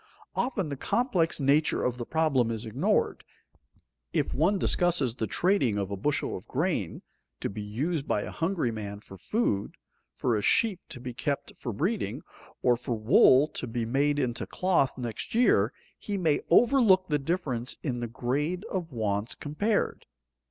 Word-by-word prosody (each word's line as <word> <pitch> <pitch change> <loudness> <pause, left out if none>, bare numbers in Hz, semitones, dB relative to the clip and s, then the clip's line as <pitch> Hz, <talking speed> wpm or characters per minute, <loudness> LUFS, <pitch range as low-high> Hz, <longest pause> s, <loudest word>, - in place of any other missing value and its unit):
Often 230 - -1
the 140 - -3
complex 200 - +1
nature 145 +3 +2
of 125 0 -1
the 120 - -5
problem 150 -7 +2
is 115 0 -3
ignored. 145 - 0 0.9
If - - 0
one 175 +8 +2
discusses 175 -10 +2
the 115 -3 -3
trading 170 - +1
of 100 -1 -2
a - - -1
bushel 140 +10 -1
of 90 - -9
grain, 140 - -2 0.4
to - - -3
be 105 +1 -6
used 135 +9 -2
by 105 - 0
a - - -6
hungry 165 -7 -1
man 105 -2 -6
for 95 - -12
food, 100 - -1 0.4
for 120 -3 0
a 105 - 0
sheep 220 - +2
to 130 - -8
be 125 0 -6
kept 140 +3 -3
for 120 - -5
breeding, 160 - -2 0.4
or 125 -1 +5
for 120 0 -3
wool 130 +5 +6
to 125 - -5
be 115 0 -2
made 140 +5 +1
into 125 -4 -2
cloth 180 -9 +1
next 120 - -5
year, 170 - +4 0.3
he 205 -1 -3
may 160 -6 +1
overlook 215 -3 +5
the 150 -1 +2
difference 135 -6 -2
in 125 -5 -2
the 120 - -3
grade 140 - -2
of 175 -4 -3
wants 110 -2 -2
compared. 200 +9 -1
140 Hz, 165 wpm, -28 LUFS, 115-180 Hz, 0.9 s, wool